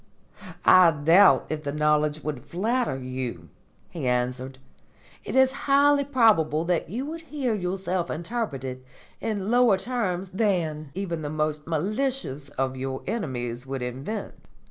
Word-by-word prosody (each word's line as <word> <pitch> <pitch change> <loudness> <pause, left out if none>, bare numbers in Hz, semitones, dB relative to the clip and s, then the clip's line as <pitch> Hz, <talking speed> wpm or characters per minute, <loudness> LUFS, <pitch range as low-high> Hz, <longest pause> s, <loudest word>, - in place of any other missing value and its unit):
"I 185 -2 +8
doubt 165 +6 +5
if 155 -1 -3
the 145 -2 -3
knowledge 150 0 +1
would 145 -5 -4
flatter 220 - -1
you," 125 -10 -5 0.4
he 160 -7 -4
answered. 125 +1 -1 0.7
"It - - -5
is 265 0 +5 0.2
highly 285 +1 +5
probable 190 - +3
that 175 -2 0
you 245 +8 -3
would 325 +2 -6
hear 285 -7 -2
yourself 185 -2 -2
interpreted 150 - -4 0.4
in 210 -1 -2
lower 240 -5 +5
terms 190 -5 -2
than 175 -7 -1
even 175 -4 -3
the 145 - -4
most 150 0 -2
malicious 175 - -2
of 135 -2 -2
your 130 0 -4
enemies 125 - -3
could 135 -1 -4
invent. 135 - -5
165 Hz, 135 wpm, -26 LUFS, 135-215 Hz, 0.7 s, I